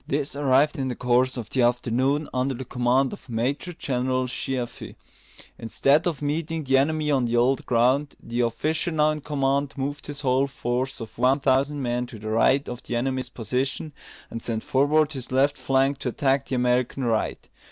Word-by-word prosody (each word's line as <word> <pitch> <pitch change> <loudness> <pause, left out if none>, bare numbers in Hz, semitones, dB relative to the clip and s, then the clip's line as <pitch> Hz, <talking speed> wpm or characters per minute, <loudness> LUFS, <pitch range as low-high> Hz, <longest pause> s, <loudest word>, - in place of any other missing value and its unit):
This 140 0 -2
arrived 145 +2 +2
in 135 - -1
the 125 - -3
course 125 +2 +1
of 115 -3 -6
the 130 - +1
afternoon, 125 +4 +1
under 130 +1 0
the 130 +2 -6
command 125 +2 +1
of 130 - -12
Major 130 +9 -2
General 130 -4 -1
Sheaffe. 125 -1 -4 0.6
Instead 140 +7 +2
of 155 -4 -3
meeting 160 +2 -2
the 135 -1 +3
enemy 150 +1 +1
on 135 -3 +2
the 120 0 0
old 125 +2 +2
ground, 130 +5 +2
the 120 +1 -3
officer 145 +9 0
now 155 -2 +2
in 155 0 -4
command 140 -1 0
moved 145 +2 -4
his 145 0 -4
whole 135 0 +2
force 130 -1 -3
of 110 0 -9
one 130 +3 +3
thousand 140 +1 +1
men 120 0 -1
to 120 - -10
the 110 +1 -6
right 130 +5 +3
of 125 0 -6
the 120 - -5
enemy's 130 +1 -1
position, 130 +6 -3 0.4
and 115 - -5
sent 110 -1 -3
forward 145 +3 +2
his 130 -4 -7
left 140 +2 +3
flank 135 +1 +1
to 130 - -2
attack 135 +2 0
the 130 - -2
American 125 +1 +1
right. 115 -3 -1
130 Hz, 185 wpm, -25 LUFS, 125-145 Hz, 0.6 s, the